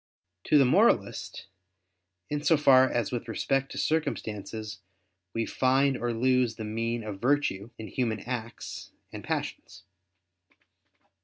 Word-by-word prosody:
To 150 - +4
the 140 - +6
moralist, 125 - +2 0.8
in 150 0 -2
so 160 +1 +4
far 130 -3 +6
as 120 -3 -1
with 120 -1 -4
respect 135 +4 -1
to - - -7
circumstances 110 -8 -2 0.5
we 115 +2 -1
find 135 +1 +2
or 120 -1 -2
lose 125 0 +2
the 110 - -6
mean 115 +2 -2
of 105 -2 -7
virtue 125 -6 +1
in 110 - -7
human 115 -4 -2
acts 120 -1 -6 0.2
and - - -7
passions. 90 +1 -4
120 Hz, 130 wpm, -28 LUFS, 110-135 Hz, 0.8 s, the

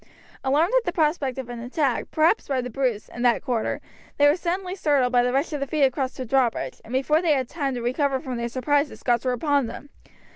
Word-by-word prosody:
Alarmed 300 - +2
at - - -10
the 350 - -1
prospect 300 -5 0
of 260 -2 -5
an 240 -1 -7
attack, 255 +2 -1
perhaps 325 +7 +2
by 270 -2 0
the 250 0 -4
Bruce, 245 -4 -1
in 240 - -8
that 240 -1 +3
quarter, 235 -3 -1 0.4
they 290 - +6
were 290 - +5
suddenly 365 +1 -3
startled 290 -9 +2
by 245 - +5
the 245 0 +1
rush 275 +5 0
of 285 -2 -1
feet 305 -2 +1
across 260 -1 +1
the 255 - -4
drawbridge, 250 -1 0
and 225 - -13
before 275 +5 +2
they 335 -4 +3
had 260 -3 0
time 275 -3 -2
to 240 - -4
recover 265 +2 0
from 260 -4 -5
their 235 0 -2
surprise 285 +4 +1
the - - -11
Scots 240 0 0
were 255 - +1
upon 280 0 +1
them. 280 +5 -9
270 Hz, 235 wpm, -24 LUFS, 250-300 Hz, 0.4 s, they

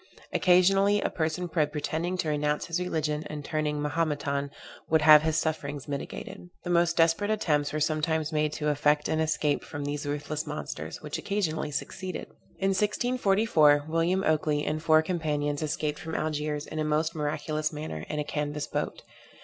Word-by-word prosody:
Occasionally, 195 +3 +4
a - - -1
person 160 +1 -1
by 160 -3 +1
pretending 160 +4 -2
to 160 - -1
renounce 150 0 0
his 170 +1 -2
religion, 155 -4 -1
and 150 -2 -6
turning 155 -2 -1
Mahometan 145 -2 -1 0.4
would 160 -1 +3
have 150 -1 +9
his 160 0 0
sufferings 150 -3 -2
mitigated. 145 +4 -6
The 175 - -3
most 170 -1 +3
desperate 165 +5 +3
attempts 150 -9 +1
were 155 - -2
sometimes 155 +1 0
made 150 -1 +1
to 150 0 -1
effect 150 0 +2
an 155 - 0
escape 155 -2 +1
from 145 -2 -6
these 145 0 -3
ruthless 150 +2 -3
monsters, 150 +1 -6
which 150 -1 -4
occasionally 170 -7 -1
succeeded. 185 +5 -5 0.3
In 195 - +1
1644 195 -7 +3
William 165 +4 +1
Oakley 150 -1 +1
and 155 +1 -1
four 155 -1 +5
companions 150 -4 -1
escaped 150 -1 -2
from 160 0 -5
Algiers, 150 -1 -2
in 155 - -6
a - - +1
most 155 +2 0
miraculous 155 0 -2
manner, 150 - -5
in 150 - -3
a 150 - 0
canvas 150 0 -3
boat. - - -3
155 Hz, 165 wpm, -28 LUFS, 150-165 Hz, 0.4 s, have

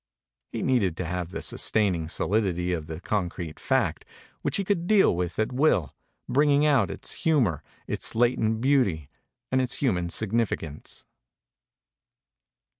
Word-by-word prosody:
He - - -3
needed 100 -10 +1
to 95 - -3
have 90 0 -3
the - - -6
sustaining 90 -7 0
solidity 90 -3 0
of 80 -3 -4
the 80 0 -6
concrete 90 -5 -3
fact, - - 0 0.4
which - - 0
he 200 - 0
could 180 -3 -1
deal 205 - +5
with 85 -1 -3
at 110 +3 0
will, 125 - +2 0.3
bringing 145 +3 +3
out 145 -4 +3
its - - -5
humor, 125 - +2 0.2
its - - -2
latent 115 -2 +2
beauty 100 - +1 0.4
and 130 0 +3
its 125 0 -1
human 90 -11 0
significance. 100 -7 -2
110 Hz, 135 wpm, -26 LUFS, 85-130 Hz, 0.4 s, deal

